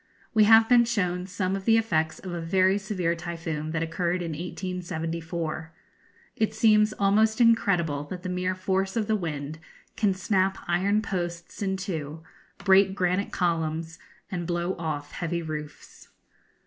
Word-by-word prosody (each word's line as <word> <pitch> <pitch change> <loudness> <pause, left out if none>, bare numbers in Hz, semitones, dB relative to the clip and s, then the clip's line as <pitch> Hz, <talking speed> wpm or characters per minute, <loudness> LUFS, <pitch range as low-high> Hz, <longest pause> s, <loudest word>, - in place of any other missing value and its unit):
We 215 -1 +6
have 225 +1 +7
been 245 -1 +6
shown 180 -6 -1
some 190 0 -1
of 195 -1 -5
the 225 -1 +5
effects 160 -8 0
of 185 -2 -7
a 170 - -3
very 185 +4 +3
severe 185 -4 -1
typhoon 165 -2 -4
that 165 +1 -1
occurred 175 +2 -1
in 165 - -3
1874. 165 -1 -4 0.6
It 220 -1 0
seems 215 -1 +4
almost 215 +3 +2
incredible 180 -11 +3
that 180 +4 -7
the - - -4
mere 180 0 -1
force 190 +1 -1
of 225 -2 +1
the 220 0 +1
wind 155 -5 -4 0.4
can 205 -4 +1
snap 190 0 +1
iron 195 +5 +2
posts 175 -3 -4
in 190 -1 0
two, 160 -5 -5 0.3
break 195 0 +4
granite 185 +1 0
columns, 165 -2 -1 0.3
and 175 -3 -3
blow 175 +1 -1
off 150 -3 -4
heavy 170 0 -3
roofs. 150 -2 -8
180 Hz, 150 wpm, -26 LUFS, 165-195 Hz, 0.6 s, have